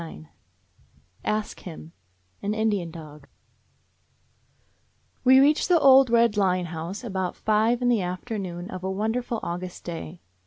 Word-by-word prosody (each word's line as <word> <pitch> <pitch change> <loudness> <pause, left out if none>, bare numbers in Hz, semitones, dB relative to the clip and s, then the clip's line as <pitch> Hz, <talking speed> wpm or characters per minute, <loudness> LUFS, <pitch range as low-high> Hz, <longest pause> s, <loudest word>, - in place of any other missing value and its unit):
193 85 - -11
ASK 215 0 -3
HIM: 165 -2 -10 0.5
AN 205 +1 -2
INDIAN 210 -6 0
DOG 150 -3 -11 2.0
W 260 +1 +7
E - - +8
reached 300 +5 +2
the 350 -2 +5
old 270 -2 +7
red 230 -2 +3
Line 185 -3 +2
House 170 +6 -6
about 190 -5 -3
five 220 +3 +1
in - - +2
the 235 -4 +3
afternoon 180 -1 -5
of 185 0 -7
a 190 - -2
won 210 +3 -1
derful 240 -1 -3
August 180 +1 -5
day. 170 0 -7
190 Hz, 145 wpm, -25 LUFS, 175-230 Hz, 2.0 s, E